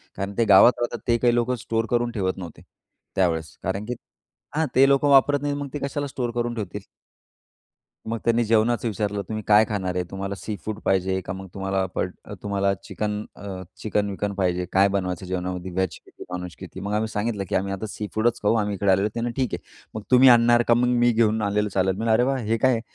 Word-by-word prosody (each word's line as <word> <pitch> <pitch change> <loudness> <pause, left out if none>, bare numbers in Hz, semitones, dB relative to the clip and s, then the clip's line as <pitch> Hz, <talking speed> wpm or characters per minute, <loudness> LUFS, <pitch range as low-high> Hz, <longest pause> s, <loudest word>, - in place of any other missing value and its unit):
कारण 100 +1 -4
ते 115 - +3
गावात 110 +5 +7
राहतात, 120 0 -2
ते 120 0 +3
काही 120 0 +2
लोकं 120 +1 +1
स्टोअर 115 0 0
करून 120 0 +1
ठेवत 95 -5 -2
नव्हते 85 -4 -9 0.5
त्यावेळेस 80 -5 0
कारण, 95 +3 -2
की 125 - -3 0.6
हां, 160 +1 +2
ते 135 +2 +6
लोक 140 +1 +3
वापरत 140 0 +5
नाहीत, 145 0 -1
मग 145 -1 -4
ते 145 - -3
कशाला 145 +1 -3
स्टोअर 125 -3 -3
करून 120 0 -1
ठेवतील? 105 -2 -5 1.3
मग 115 +1 -2
त्यांनी 115 0 +3
जेवणाचं 115 +2 +2
विचारलं, 105 -1 -2
तुम्ही 110 -1 -4
काय 105 +1 +6
खाणार 95 -4 -2
आहे? 90 - 0
तुम्हाला 95 +1 -4
सीफूड 105 0 -5
पाहिजे 95 0 +1
का 90 - -4
मग 95 0 -8
तुम्हाला 95 -1 -1
प - - -2 0.4
तुम्हाला 100 -1 +1
चिकन 105 -1 -3 0.2
अ, 95 -2 -7 0.2
चिकन-विकन 105 0 -2
पाहिजे? 90 -2 0
काय 95 +1 +5
बनवायचं 95 -2 -2
जेवणामध्ये? 90 0 -4
व्हेज 95 0 -1
किती, - - -12
नॉनव्हेज 90 -1 -6
किती? 95 0 -9
मग 100 +2 -4
आम्ही 110 +1 0
सांगितलं, 105 -1 -2
की - - -1
आम्ही 95 +1 0
आता 100 +3 -4
सीफूडच 110 +3 -1
खाऊ 105 - +3
आम्ही 105 -2 0
इकडे 100 +1 +2
आलेलो 95 +2 +3
ते. 120 +1 -1
ठीक 125 -2 -2
आहे, - - -2 0.4
मग 110 - -5
तुम्ही 130 +1 +8
आणणार 120 0 +6
का? 120 - +6
मग 120 +1 +2
मी 120 0 +4
घेऊन 110 -1 +2
आलेलं 105 0 0
चालेल. 95 -1 +1
म्हणलं, 115 +2 0
अरे 120 +3 +4
वाह! 135 +1 +1
हे 115 +2 0
काय 130 +3 +3
आहे? 115 -2 0
105 Hz, 210 wpm, -24 LUFS, 95-120 Hz, 1.3 s, तुम्ही